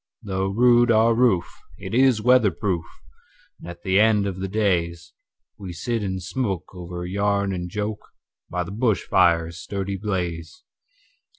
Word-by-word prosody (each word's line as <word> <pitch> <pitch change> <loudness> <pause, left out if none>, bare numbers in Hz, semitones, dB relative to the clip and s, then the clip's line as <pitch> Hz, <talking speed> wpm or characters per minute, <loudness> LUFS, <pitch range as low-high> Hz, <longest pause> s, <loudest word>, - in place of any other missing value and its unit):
Though 95 -1 -2
rude 120 +4 +4
our 115 0 +4
roof, 115 -8 +1 0.2
it 95 +1 -8
is 125 -3 +3
weather 125 -3 +5
proof, 85 -1 -2 0.8
And 85 - -10
at 85 0 -10
the 95 +1 +2
end 105 -2 +4
of 95 -2 -4
the 95 0 -3
daysWe 90 -1 -4
sit 115 +6 -2
and 95 -2 -3
smoke 100 -4 -3
over 90 -1 -7
yarn 100 +1 0
and 90 -1 -4
joke, 105 +2 -4 0.5
By 90 0 -2
the 85 - -8
bush 110 -3 0
fire's 85 -1 +2
sturdy 100 +2 -4
blaze. 90 -5 -4
95 Hz, 150 wpm, -23 LUFS, 90-110 Hz, 0.8 s, weather